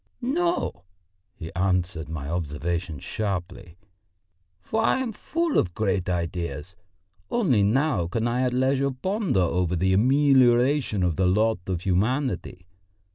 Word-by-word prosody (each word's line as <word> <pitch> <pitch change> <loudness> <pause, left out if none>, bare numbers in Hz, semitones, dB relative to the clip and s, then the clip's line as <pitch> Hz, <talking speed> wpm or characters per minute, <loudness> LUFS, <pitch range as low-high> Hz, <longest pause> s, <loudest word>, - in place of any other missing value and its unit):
"No!" 290 - -1 0.5
he 80 0 -8
answered 90 -3 -1
my 75 -3 -5
observation 85 0 -3
sharply, 90 -1 -5 0.8
"for 220 - -2
I - - +3
am 260 -3 -2
full 330 +9 -1
of 90 -2 -2
great 100 -4 0
ideas, 85 -1 -3 0.5
only 175 - +2
now 110 - +1
can 115 +6 -1
I 120 +2 0
at 125 -1 +1
leisure 135 +2 +1
ponder 185 - -1
over 90 0 0
the 95 +2 +1
amelioration 130 -1 +3
of 85 -3 0
the 95 - +2
lot 110 +3 +2
of 90 -3 -2
humanity. 100 -1 -1
100 Hz, 130 wpm, -25 LUFS, 90-130 Hz, 0.8 s, I